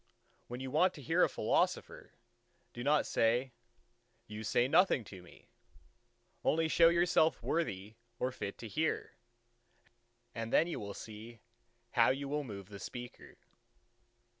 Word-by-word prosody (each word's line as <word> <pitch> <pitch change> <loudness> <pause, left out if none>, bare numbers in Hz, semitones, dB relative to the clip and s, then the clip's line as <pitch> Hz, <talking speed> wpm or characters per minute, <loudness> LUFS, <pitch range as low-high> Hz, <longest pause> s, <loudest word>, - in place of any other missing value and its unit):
When 125 +1 -6
you 130 -1 -5
want 180 +6 +3
to 145 - -10
hear - - +3
a - - +3
philosopher, - - -1 0.6
do 120 - -6
not 145 +2 +3
say, 120 +3 +1 0.7
You 105 +1 -7
say 120 +3 +2
nothing 165 -4 +4
to 95 -2 -11
me'; 90 - -18 1.0
only 160 +1 +2
show 165 +1 +6
yourself 170 -2 +2
worthy 105 - -2 0.2
or 125 +1 -1
fit 100 -5 -6
to 115 - -8
hear, 155 +8 -2 1.2
and 115 0 -5
then - - +5
you 170 - -4
will 100 -1 -6
see 110 +2 -10 0.5
how 115 -1 +4
you 140 +2 -1
will 150 +1 -2
move 100 -6 -8
the 100 -1 -9
speaker." 120 +5 -9
125 Hz, 140 wpm, -33 LUFS, 110-155 Hz, 1.2 s, show